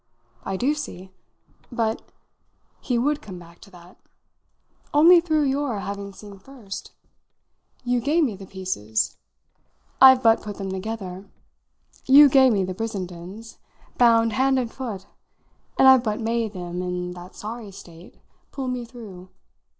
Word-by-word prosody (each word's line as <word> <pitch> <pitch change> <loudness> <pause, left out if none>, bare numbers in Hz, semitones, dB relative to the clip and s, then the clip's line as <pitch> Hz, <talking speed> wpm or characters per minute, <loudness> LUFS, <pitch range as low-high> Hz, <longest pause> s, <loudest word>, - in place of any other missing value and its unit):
"I 195 - -3
do 265 +8 +1
see. 190 -11 -8 0.6
But" 230 -2 -1 0.8
he 245 - -1
would 290 +5 0
come 190 -4 -10
back 170 -1 -15
to 200 - -15
that 180 -1 -17 1.0
"only 335 +4 +7
through 315 -3 +1
your 275 -4 -1
having 200 0 -6
seen 200 0 -13
first. 215 -4 -10 0.9
You 245 -1 0
gave 310 +6 +2
me 235 -8 -1
the 190 0 -12
pieces. 180 - -3 0.8
I've 260 -1 +8
but 225 -1 +4
put 205 -1 -8
them 195 -1 -5
together. 190 -1 -6 0.8
You 285 +2 +8
gave 265 -1 +5
me 200 -3 +1
the 185 0 -4
Brissendens 195 0 -7 0.4
bound 230 -2 +4
hand 265 +2 +2
and 240 -3 -2
foot; 220 -8 -6 0.7
and 265 - +6
I've 260 -2 +7
but 215 -1 -2
made 225 -1 -2
them, 180 -1 -5
in 180 0 -4
that 180 0 -11
sorry 220 0 -7
state, 175 -2 -14 0.3
pull 270 -2 -5
me 250 -1 -4
through. 210 -7 -12
220 Hz, 140 wpm, -23 LUFS, 190-255 Hz, 1.0 s, I've